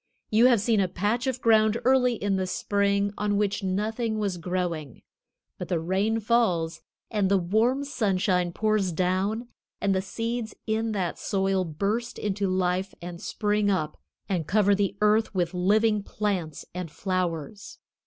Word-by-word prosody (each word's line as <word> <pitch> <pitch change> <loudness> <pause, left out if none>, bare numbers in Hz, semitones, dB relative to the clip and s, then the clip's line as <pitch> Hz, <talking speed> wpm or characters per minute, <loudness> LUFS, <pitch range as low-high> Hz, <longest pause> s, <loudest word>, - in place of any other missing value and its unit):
You 225 +3 +6
have 240 -4 +4
seen 220 +1 +2
a 190 - +2
patch 210 +8 -1
of 255 -1 -2
ground 220 0 +4
early 250 -2 +4
in 200 -2 -1
the 190 -1 -1
spring 200 +1 0
on 205 -1 +1
which 205 0 0
nothing 215 +4 -1
was 200 -4 -1
growing. 170 -6 -3 0.6
But - - -4
the 175 - 0
rain 195 +7 0
falls, 200 -8 +1 0.3
and 205 -4 +1
the 200 - +4
warm 220 +10 +1
sunshine 190 -9 0
pours 215 -1 +1
down, 190 +7 -1 0.3
and 200 -1 +1
the 190 - +1
seeds 225 +3 -4
in 225 0 0
that 185 -4 -2
soil 195 -1 0
burst 205 +9 -2
into 200 -1 -1
life 185 +1 0
and 175 0 -8
spring 210 -1 0
up 155 -6 0 0.3
and 175 -6 -1
cover 205 0 +3
the 200 0 0
earth 210 0 +3
with 175 -1 0
living 210 +4 +2
plants 195 -7 -3
and 180 -2 -5
flowers. 185 +1 -3
200 Hz, 155 wpm, -26 LUFS, 185-220 Hz, 0.6 s, You